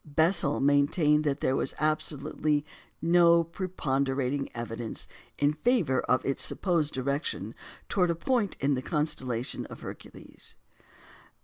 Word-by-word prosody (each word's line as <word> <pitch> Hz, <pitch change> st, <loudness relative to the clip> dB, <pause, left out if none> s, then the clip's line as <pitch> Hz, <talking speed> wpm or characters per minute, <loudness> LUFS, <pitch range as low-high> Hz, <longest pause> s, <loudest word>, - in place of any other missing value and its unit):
Bessel 155 Hz, 0 st, +2 dB
maintained 145 Hz, +2 st, +3 dB
that 140 Hz, -2 st, 0 dB
there 130 Hz, -, +2 dB
was -, -, -1 dB
absolutely 150 Hz, -1 st, 0 dB, 0.4 s
no 170 Hz, 0 st, +5 dB
preponderating 140 Hz, -6 st, -1 dB
evidence 115 Hz, -1 st, -4 dB, 0.3 s
in 145 Hz, +1 st, +2 dB
favour 155 Hz, -, +2 dB
of 125 Hz, -, +1 dB
its 135 Hz, -, 0 dB
supposed 165 Hz, -6 st, +1 dB
direction 140 Hz, +4 st, -2 dB, 0.3 s
towards 180 Hz, -3 st, +2 dB
a -, -, -1 dB
point 220 Hz, +3 st, 0 dB
in 140 Hz, +1 st, +2 dB
the 130 Hz, -, -1 dB
constellation 130 Hz, -6 st, -2 dB
Hercules. -, -, -8 dB
150 Hz, 115 wpm, -28 LUFS, 135-170 Hz, 0.4 s, no